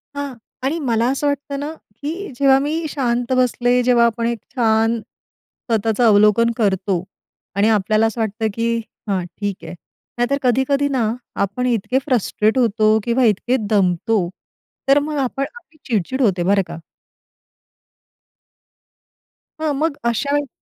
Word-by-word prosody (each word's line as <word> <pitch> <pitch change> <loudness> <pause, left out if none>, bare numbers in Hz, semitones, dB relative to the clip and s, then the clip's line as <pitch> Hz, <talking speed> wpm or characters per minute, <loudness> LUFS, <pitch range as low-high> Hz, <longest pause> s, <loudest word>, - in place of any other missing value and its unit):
हां. 285 -1 -4 0.3
आणि 290 +6 0
मला 235 -5 +1
असं 280 +2 -1
वाटतं 285 0 -2
ना, 295 +2 -4 0.3
की 335 +6 -4
जेव्हा 270 -1 +5
मी 315 +4 -2
शांत 245 -3 -1
बसले 250 0 +2
जेव्हा 240 -1 +4
आपण 230 0 0
एक 235 -1 -2 0.2
छान 225 -1 +2
स्वतःचं 225 +1 -4
अवलोकन 215 +2 +5
करतो 190 -4 0 0.5
आणि 205 +2 +3
आपल्याला 215 +1 +2
असं 225 +1 -3
वाटतं, 220 +1 -1
की 230 +1 0 0.3
"हां, 190 -2 0
ठीक 195 +2 -5
आहे." - - -7 0.4
नाहीतर 245 +4 +1
कधी-कधी 265 +3 +2
ना, 260 -5 +1 0.4
आपण 250 +6 -4
इतके 245 +2 +1
फ्रस्ट्रेट 225 -3 +1
होतो 220 -2 +3
किंवा 240 +3 +1
इतके 230 +4 +2
दमतो, 190 -1 +1 0.6
तर 275 +1 +6
मग 300 +1 -3
आपण 270 +1 -1
आपली 330 -10 -16
चिड-चिड 240 +4 -1
होते 185 -7 +2
बरं 195 +2 +3
का. 170 0 -7 2.8
हां, 310 -2 0
मग 300 +1 -1
अशा 235 +5 0
वेळी 290 -1 0
235 Hz, 140 wpm, -20 LUFS, 215-275 Hz, 2.8 s, तर